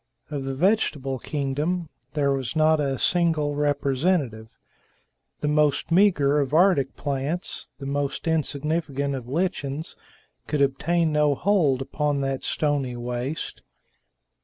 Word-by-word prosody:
Of 140 -2 -3
the 135 0 -3
vegetable 145 - +1
kingdom, 150 +6 -2 0.2
there 145 -2 +1
was 135 +1 -2
not 155 0 +4
a 135 -2 0
single 160 -4 +1
representative; 140 -4 0 0.8
the 150 - 0
most 150 0 +2
meager 165 -6 +4
of 140 +1 0
Arctic 165 -7 +4
plants, 145 +5 -2
the 135 - -8
most 140 +3 -2
insignificant 150 -2 -1
of 130 -3 -5
lichens, 155 -1 -2 0.5
could 150 -2 +2
obtain 165 +4 +1
no 150 -1 +3
hold 150 -8 +2
upon 145 0 -1
that 135 -1 -2
stony 145 -5 0
waste. 120 +5 -4
145 Hz, 120 wpm, -25 LUFS, 135-160 Hz, 0.8 s, not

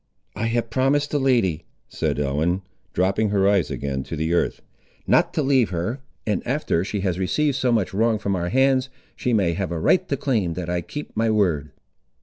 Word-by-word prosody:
"I 115 - -1
have 115 -1 -1
promised 135 +4 +1
the 145 - +1
lady," 120 - +2 0.2
said - - -2
Ellen, 80 +7 0 0.3
dropping 95 +4 +1
her 100 -1 +2
eyes 100 -4 +2
again 70 -1 -3
to - - -5
the 80 +2 -1
earth, 85 - 0 0.4
"not - - +3
to 155 - +1
leave 135 -4 +3
her; 95 +9 -3 0.2
and 105 -4 0
after 125 - 0
she 100 +1 -3
has 95 -2 -1
received 145 +9 +1
so 130 -2 +1
much 110 -6 +1
wrong 110 +2 +2
from 100 -2 -1
our 85 -1 -2
hands, 130 +1 +3 0.3
she 125 - -1
may 95 -7 +2
have 90 +1 -3
a 85 - -2
right 130 - +2
to 140 - 0
claim 110 -11 0
that 90 -1 -4
I 90 0 0
keep 150 - -8
my 115 +1 +1
word." 85 -9 +1
105 Hz, 200 wpm, -23 LUFS, 85-130 Hz, 0.4 s, not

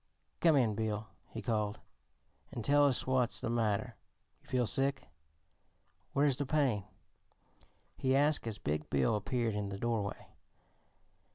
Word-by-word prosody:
"Come 165 -3 +5
in, 120 -6 +3
Bill," 110 0 -2 0.2
he - - -7
called, 105 -2 -1 0.7
"an' 120 - -5
tell 145 +2 +5
us 130 - 0
what's 130 -2 +1
the 115 - -2
matter. 110 -1 0 0.4
Feel 125 -1 0
sick? 135 +4 +1 1.1
Where's 140 -2 +3
the 145 - -1
pain?" 130 -10 +1 1.1
he 130 0 +1
asked 145 -2 +2
as 110 -2 -3
big 75 -3 -3
Bill 70 - +2
appeared 115 +2 -1
in 105 -1 -2
the 100 - -5
doorway. 110 -2 -2
115 Hz, 130 wpm, -33 LUFS, 105-135 Hz, 1.1 s, Come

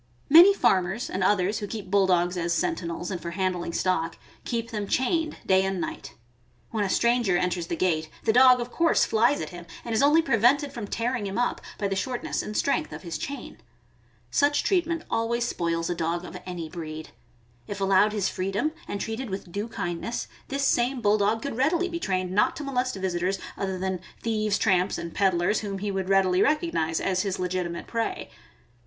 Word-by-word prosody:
Many 340 +7 +9
farmers 190 - +1
and 190 - -1
others 200 +1 +2
who 205 - -4
keep 200 -3 -7
Bulldogs 185 -3 +3
as 170 -1 0
senti 170 +1 -1
nels 170 +2 -4
and 180 - -4
for 170 - -4
handling 180 -1 -2
stock, 165 -2 0 0.3
keep 230 -1 -3
them 210 -2 -3
chained 310 - 0
day 190 0 +4
and 190 -1 -1
night. 140 -4 -5 0.6
When 220 -2 0
a 195 - -1
stranger 235 -4 +2
enters 175 -1 -1
the 170 - -2
gate, 160 -3 0
the 220 - +2
dog 255 +1 +7
of 240 0 -4
course 335 -1 +3
^ - - -7
flies 235 +6 +3
at - - -5
him, 175 -1 -10 0.2
and 235 - -3
is 220 - +2
only 300 +4 +5
prevented 275 +3 +3
from 230 -5 -5
tearing 235 -1 -2
him 195 - -4
up 245 0 0 0.2
by 200 - -1
the 195 - -2
shortness 245 +5 -2
and 210 - -5
strength 310 +3 0
of - - -8
his 170 -3 -5
chain. 280 0 -6 0.7
Such 285 0 +2
treatment 335 -3 +1
always 235 +1 0
spoils 165 -3 -1
a - - 0
dog 170 +1 -2
of - - -9
any 175 -3 -5
breed. 155 -1 -7 0.6
If 200 - -5
allowed 195 +2 +4
his 205 -3 0
freedom 195 +11 -1 0.2
and 200 - -4
treated 225 +4 -4
with 190 -2 -6
due 205 +4 -3
kindness, 225 +1 -4 0.2
this 275 +1 -2
same 250 0 +2
Bulldog 210 +1 +2
could 280 - -3
readily 335 +7 +2
be 335 -1 -4
trained 185 - -1
not 205 +3 +2
to 300 - -6
molest 255 -3 -1
visitors, 190 0 -1 0.2
other 190 -1 -3
than 190 0 -2 0.2
thieves, 215 -2 +1
tramps, 185 -2 +2
and 170 -1 -6
peddlers, 185 +1 +2
whom 200 -2 -4
he 200 +1 -3
would 190 -1 -3
readily 190 -2 +3
recog 310 - +2
nize 160 0 0
as 185 -1 0
his 195 -2 -2
legitimate 180 -2 -3
prey. 230 -1 -3
200 Hz, 195 wpm, -26 LUFS, 180-240 Hz, 0.7 s, Many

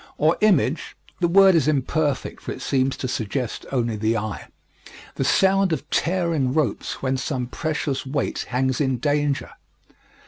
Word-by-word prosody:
Or 155 +3 +3
image 185 -8 +2 0.2
(the 175 - +2
word 195 +2 +6
is 165 -3 +3
imperfect, 145 -1 0
for - - -6
it - - -7
seems 135 0 +1
to 130 - -3
suggest 120 0 -3
only 120 -4 0
the 110 +2 0
eye) 110 0 -5 0.7
the - - -2
sound 190 +5 +3
of 160 - -2
tearing 165 -6 0
ropes 155 -4 -1
when 130 0 0
some 130 -1 -2
precious 150 +1 -2
weight 135 +1 -2
hangs 130 +2 0
in 130 -3 +1
danger. 145 +1 0
140 Hz, 150 wpm, -23 LUFS, 130-160 Hz, 0.7 s, word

